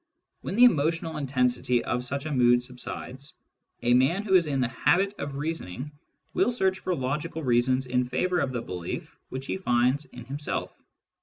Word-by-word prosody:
When - - -4
the 240 - +6
emo 155 -12 +6
tional 165 -1 -3
intensity 125 -3 +1
of 125 - -1
such 140 +3 -3
a 155 - -3
mood 120 -2 +4
subsides, 130 +2 -7 0.5
a 120 0 +4
man 135 +11 +3
who 200 -2 -1
is 175 -4 +5
in 140 -2 0
the 125 - +2
habit 190 +10 +2
of 140 -1 -4
reasoning 145 - -4 0.4
will - - +3
search 190 -6 +1
for 185 - -1
logical 150 +5 -3
reasons 130 +1 +2
in 125 0 +1
favour 180 +8 0
of 135 - 0
the 120 -2 -3
belief 90 -2 -6
which 130 +1 -5
he - - -2
finds 130 -3 +2
in 125 -3 -11
himself. 140 +3 -4
135 Hz, 180 wpm, -27 LUFS, 125-165 Hz, 0.5 s, the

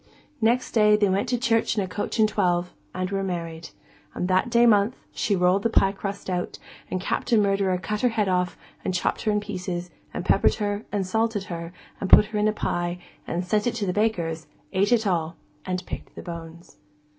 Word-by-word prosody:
Next 240 +3 +2
day 210 -2 +5
they 205 -2 +3
went 195 +5 0
to 245 - +1
church 230 -2 +1
in 205 - +2
a - - -4
coach 205 +5 -3
and 220 -1 +5
twelve, 180 -4 0 0.2
and 185 +1 -3
were 195 0 0
married. 170 -3 -4 0.5
And 180 - -1
that 185 +5 +2
day 235 0 +5
month, 215 +1 +4 0.2
she 205 - 0
rolled 180 +2 +3
the 230 - +1
pie 195 -3 +4
crust 200 0 -6
out, 180 -1 -2 0.3
and 185 - -2
Captain 220 +4 +1
Murderer 195 -2 +2
cut 210 +3 -3
her 250 - +4
head 220 -3 0
off, 180 -1 0 0.3
and 185 - -1
chopped 180 - 0
her 215 - +1
in 210 - +2
pieces, 180 -4 -5 0.2
and - - -5
peppered - - +4
her, 205 0 -2
and 200 -2 -1
salted 220 +1 0
her, 170 0 -6 0.3
and 195 - -3
put - - +9
her 210 0 -3
in 210 - +2
the 215 - +4
pie, 175 -4 -2 0.3
and 175 +2 -2
sent 210 +4 +1
it 240 - 0
to 215 -3 -1
the 180 - -1
baker's, 170 -7 -1 0.3
and 190 - +1
ate 205 - +3
it 230 -2 +3
all, 170 -4 0 0.3
and 185 -1 -2
picked - - -7
the - - -8
bones. 170 0 -9
195 Hz, 215 wpm, -25 LUFS, 180-215 Hz, 0.5 s, put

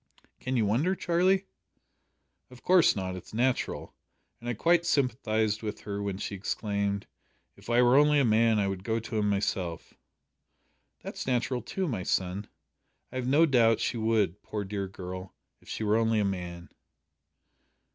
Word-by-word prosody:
"Can 130 0 -2
you 110 - +2
wonder, 140 - +1
Charlie?" 185 +3 +2 1.0
"Of 125 -1 -15
course 180 -2 +5
not. 95 -2 -3
It's 90 +3 -10
natural, 125 +2 -1 0.5
and 120 - -6
I 120 - -1
quite 170 +8 +3
sympathised 110 -8 0
with 110 -1 -5
her 100 -1 -4
when 100 -2 -3
she 100 - -5
exclaimed, 100 0 -2 0.5
`If - - -8
I 120 +1 +5
were 125 +2 +5
only 150 0 +5
a 140 - +3
man 110 0 +4
I 100 -1 +1
would 95 -1 -4
go 115 +2 0
to 110 0 -3
him 105 -1 +1
myself.'" 95 -4 -2 1.1
"That's - - -6
natural 125 0 0
too, 190 -1 -3
my 115 - -2
son. 95 +2 -1 0.6
I 130 - -5
have 125 -1 -2
no 145 +5 +5
doubt 115 -6 +4
she - - -1
would, 110 -4 +1
poor 105 -1 -4
dear 100 0 -4
girl, 95 -1 -8 0.3
if - - -17
she - - -4
were 105 +1 +3
only 115 -1 +2
a 105 - +2
man." 90 -3 -4
110 Hz, 165 wpm, -29 LUFS, 100-125 Hz, 1.1 s, course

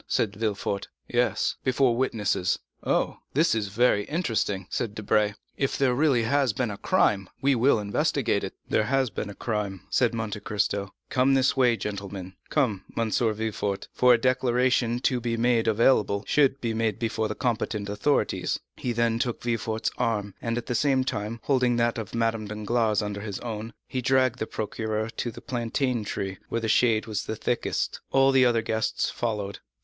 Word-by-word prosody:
said 105 -3 0
Villefort. 105 -2 -2 0.2
"Yes, 120 -1 +1
before 130 -2 +3
witnesses." 105 -7 0 0.3
"Oh, - - 0 0.2
this 160 +4 +4
is 110 -2 0
very 105 0 +2
interesting," 115 - -1
said 110 -3 -2
Debray; 105 -1 +1 0.2
"if 135 - 0
there 135 -2 +3
really 130 -3 +3
has 135 0 +2
been 120 -2 -1
a 100 - -6
crime, 100 -2 +2
we 140 +1 +3
will 125 +1 +4
investigate 100 -1 0
it." - - -5
"There 110 - +2
has 135 -2 +1
been 105 - -4
a 100 - -8
crime," 105 -5 -3
said 120 -2 +2
Monte 110 -2 -3
Cristo. 100 -1 -2 0.2
"Come 130 +1 +3
this 135 0 +3
way, 125 -3 +3
gentlemen; 100 -2 -5 0.2
come, 110 -11 +1
M. 115 -1 0
Villefort, 110 -3 -1
for 125 -1 +6
a - - +1
declaration 125 -1 +2
to 125 -1 +1
be 115 0 -1
available, 115 -2 +3
should 140 -2 +3
be 115 -3 -2
made 110 -2 0
before 110 -1 -1
the - - -4
competent 110 -4 -1
authorities." 105 +8 0 0.2
He 125 - -2
then 115 0 +1
took 120 -1 -2
Villefort's 115 -2 -1
arm, 105 -4 0
and, 115 0 -1
at 120 - -3
the - - -2
same 135 0 +2
time, 110 -2 -3
holding 125 -3 +2
that 120 0 +1
of 110 0 -6
Madame 115 -2 0
Danglars 110 0 0
under 100 0 -4
his 100 -2 -5
own, 115 -1 -5
he 130 - -3
dragged 130 -1 +2
the 110 - -2
procureur 110 +1 -3
to 120 - -1
the 120 - -10
plantain 120 0 -1
tree, 95 -2 -4
where 115 - -1
the 110 - -1
shade 110 -1 +3
was 110 -2 -2
thickest. 110 +2 -2
All 135 0 +5
the 130 -1 +5
other 115 -2 +2
guests 110 0 -1
followed. 105 -4 -3
115 Hz, 175 wpm, -26 LUFS, 105-125 Hz, 0.3 s, for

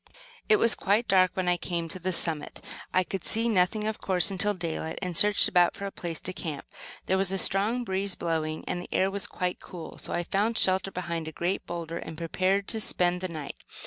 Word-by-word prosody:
It 435 - +7
was 230 - +4
quite 210 +4 +1
dark 185 -1 +5
when 185 -1 -1
I 175 0 +3
came 170 -2 -3
to 185 - -4
the 185 +1 -2
summit. 165 -3 -1 0.3
I 185 - +3
could 190 0 -5
see 225 +1 +1
nothing, 210 0 +2
of 220 0 -3
course, 185 0 +2
until 205 +2 +2
daylight, 165 -2 -4
and 180 -2 -3
I - - -7
searched 205 +5 +5
about 175 -1 +3
for 200 - -6
a 200 - -4
place 170 -4 -5
to 185 - -4
camp. 155 -6 -6 0.4
There 190 +1 +1
was 190 -1 +4
a 195 - +1
strong 210 +6 +4
breeze 195 -2 -1
blowing 160 -2 -2
and 175 - -2
the - - -10
air 190 +1 +2
was 200 -1 0
quite 180 0 -3
cool, 170 -3 -9
so - - -5
I 175 - -1
found 210 +6 0
shelter 190 +1 +3
behind 170 -3 -4
a - - -5
great 175 +4 -2
boulder 170 -1 -5
and 160 0 -8
prepared 185 +4 0
to 225 - +2
spend 180 -3 +1
the 185 - -1
night. 155 -5 -7
185 Hz, 230 wpm, -27 LUFS, 170-195 Hz, 0.4 s, It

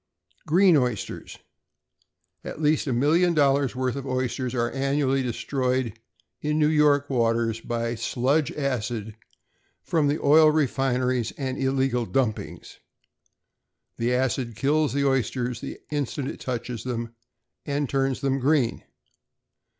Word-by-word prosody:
=Green 180 +2 +5
Oysters.= 125 -6 -3 1.1
At - - -7
least 155 0 +1
a - - 0
million 160 +8 +3
dollars 140 -3 +2
worth 130 0 -1
of 140 -1 -5
oysters 130 0 -2
are 120 -1 0
annually 135 0 0
destroyed 125 -1 -2 0.4
in 150 0 0
New 150 -1 +3
York 145 -2 +3
waters 115 -3 +1
by 115 0 -2
sludge 130 +6 0
acid 120 -6 -3 0.7
from 160 -4 +1
the 145 +2 +1
oil 155 +2 +6
refineries 130 -5 0
and 130 -2 -4
illegal 130 -3 0
dumpings. 125 -5 -3 1.2
The 115 +1 0
acid 125 -2 -1
kills 150 +3 +1
the 140 0 +1
oysters 125 -2 -1
the - - -7
instant 145 -1 -2
it - - -8
touches 120 -2 -4
them, 115 -2 -4 0.5
and 145 0 -1
turns 135 0 -1
them 135 0 0
green. 135 -3 +1
130 Hz, 125 wpm, -25 LUFS, 120-145 Hz, 1.2 s, oil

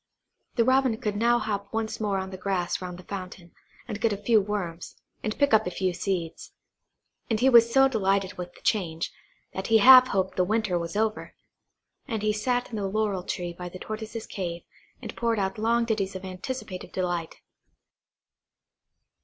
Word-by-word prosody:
The 235 - +4
Robin 260 -2 +3
could 210 -3 -2
now 235 +3 +3
hop 200 -3 -3
once 220 -1 -2
more 205 -3 0
on 190 0 -4
the - - -6
grass 185 -2 -1
round 180 -1 -6
the 185 - -12
fountain, 185 -3 -8 0.4
and 215 -3 -5
get 230 - +2
at 200 - -3
a - - -20
few 220 0 +4
worms, 190 -5 -4 0.3
and 215 - -3
pick 285 -4 +2
up 220 -2 +5
a - - +1
few 185 0 -1
seeds. 175 -2 -3 0.8
And 220 -2 +1
he 260 +3 +5
was 235 -2 +7
so 270 +2 +6
delighted 195 -5 0
with 180 -1 -7
the - - -17
change, 170 -6 -1 0.4
that 190 - -4
he 225 - +5
half 255 +3 +9
hoped 190 -3 -1
the 180 - +4
winter 210 -1 0
was 170 +3 -5
over; 220 +1 -1 0.7
and 220 -5 -3
he 215 0 +2
sat 245 +3 -1
in 220 - -4
the 200 -2 -1
laurel 205 -2 0
tree 175 -1 -4
by 180 +1 -7
the 185 - -9
Tortoise's 220 +3 -6
cave, 175 -3 -5 0.4
and - - -6
poured 230 -1 0
out 195 +2 -1
long 230 +2 +2
ditties 200 -4 -1
of 190 0 -6
anticipative 185 +1 -6
delight. 175 -3 -2
205 Hz, 185 wpm, -26 LUFS, 185-225 Hz, 0.8 s, half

